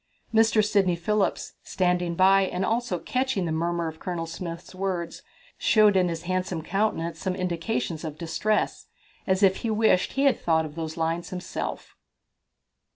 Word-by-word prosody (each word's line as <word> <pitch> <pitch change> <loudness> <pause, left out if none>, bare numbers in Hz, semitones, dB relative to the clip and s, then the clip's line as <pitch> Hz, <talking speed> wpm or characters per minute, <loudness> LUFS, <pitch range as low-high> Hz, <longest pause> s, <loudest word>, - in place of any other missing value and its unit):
Mr. 225 -1 +4
Sidney 195 -4 +2
Phillips, 200 +4 -1
standing 180 -2 0
by, 190 +2 +5
and 185 0 -2
also 225 -2 0
catching 255 -1 -1
the 165 - -2
murmur 170 +1 -1
of 160 0 -7
Colonel 175 -2 -3
Smith's 170 +1 -7
words, 185 -3 -3 0.4
showed 215 -2 +5
in 185 -1 +4
his 165 0 -4
handsome 180 -2 -2
countenance 170 -4 -1
some 185 +2 -2
indications 175 -1 -2
of 155 -2 -5
distress, 205 +6 -1 0.4
as 190 +1 +2
if 190 -1 +5
he 230 - -3
wished 215 -4 +2
he 270 - +1
had 275 -2 +3
thought 160 -1 +2
of 150 - -8
those 160 0 -5
lines 165 +1 -1
himself. 180 0 -5
180 Hz, 155 wpm, -26 LUFS, 170-205 Hz, 0.4 s, by